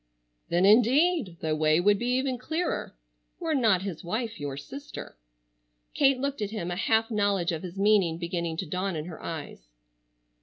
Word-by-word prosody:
"Then 175 +2 +3
indeed, 245 - +4
the 155 -1 0
way 155 +1 +3
would 205 +2 +3
be 240 - -2
even 260 -1 -1
clearer,—were - - -4
not 220 -9 +3
his 185 -5 -5
wife 220 +3 -3
your 140 -2 -4
sister." 275 - -9 0.8
Kate 275 -2 +4
looked 280 -1 -3
at 205 - -1
him, 180 -5 -4
a - - -2
half 225 +4 +1
knowledge 200 -4 +1
of 160 -2 -3
his 180 0 -8
meaning 195 -5 +3
beginning 170 -1 -3
to - - -2
dawn 185 +3 -2
in 155 -1 -4
her 170 -2 -9
eyes. 145 - -7
195 Hz, 165 wpm, -27 LUFS, 165-235 Hz, 0.8 s, indeed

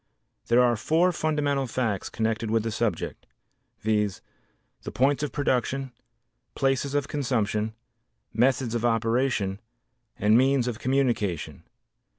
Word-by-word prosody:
There 120 +2 +5
are 120 -1 +3
four 165 - +2
fundamental 150 -4 0
facts 110 -5 -2
connected 110 0 -1
with 110 0 +1
the 115 - -2
subject, 115 0 -2 0.5
viz., 105 -2 0 0.6
the - - -6
points 140 +3 +2
of 150 - -2
production, 135 -1 -1 0.6
places 135 +1 0
of 145 -1 0
consumption, 110 -6 -1 0.6
methods 125 0 +2
of 120 -1 -1
operation 115 -3 +1 0.6
and 105 +1 +4
means 130 0 +3
of 115 -3 -3
communication. 105 - -1
120 Hz, 120 wpm, -26 LUFS, 110-135 Hz, 0.6 s, There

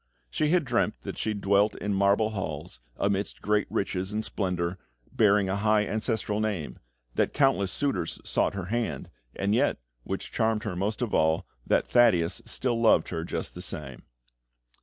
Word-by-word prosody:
She 150 - +1
had 170 -2 +3
dreamt 120 -2 +1
that - - -6
she 110 -1 -1
dwelt 100 +1 +2
in 105 0 -2
marble 100 +3 +3
halls, 80 - -5 0.2
amidst 100 0 -1
great 105 0 +1
riches 95 0 -2
and 110 +1 -2
splendour, 90 -2 -2 0.3
bearing 105 -2 +3
a 95 - 0
high 105 0 +3
ancestral 110 -1 -1
name; 95 - -3 0.3
that - - 0
countless 135 -10 +3
suitors 140 - -1
sought - - +1
her 95 -3 -4
hand; 110 - -2 0.2
and 100 +1 0
yet, 115 - +2 0.3
which 95 +7 -5
charmed 110 -1 +1
her 105 -6 -3
most 105 +6 -1
of 115 - -3
all, 80 +1 +2 0.2
that - - +2
Thaddeus 95 -8 +3
still 120 -3 0
loved 110 -8 +4
her 80 - -3
just 85 - -4
the - - -7
same. 65 -2 -2
100 Hz, 165 wpm, -27 LUFS, 95-110 Hz, 0.3 s, loved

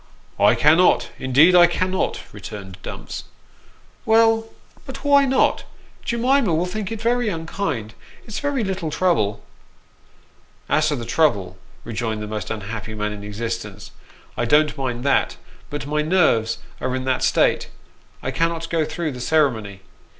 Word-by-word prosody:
" - - -31
I - - +4
cannot, 160 +5 +4
indeed 140 +7 +5
I 175 -1 +8
cannot," 185 +2 -1
returned 95 -3 -9
Dumps. - - -7 0.4
" - - -31
Well, 225 0 +4 0.4
but - - -8
why 280 -1 +5
not? 265 0 +2 0.4
Jemima 235 - +2
will 170 +3 +1
think 195 +2 -4
it 225 - -4
very 240 0 +1
unkind. 160 - -3 0.3
It's 215 - -5
very 285 -4 -1
little 190 -5 -3
trouble." 155 - 0 0.6
" - - -34
As 155 0 +2
to 150 - +1
the 120 -3 -5
trouble," 115 - +1 0.3
rejoined 110 -2 -3
the - - -4
most 105 -2 -5
unhappy 110 +1 -5
man 105 0 -2
in 100 -1 -8
existence, 105 -1 -5 0.2
" - - -27
I 120 - 0
don't 150 +4 +3
mind 125 -4 -3
that; 140 - +1 0.3
but 145 -1 -5
my 150 +1 0
nerves 150 -10 +2 0.2
are 130 - -2
in 130 - -3
that 130 -1 0
state - - +2 0.5
I - - -2
cannot 165 0 -1
go 165 -2 +2
through 155 +1 -3
the 125 -2 -8
ceremony. 115 -10 0
150 Hz, 155 wpm, -22 LUFS, 115-185 Hz, 0.6 s, I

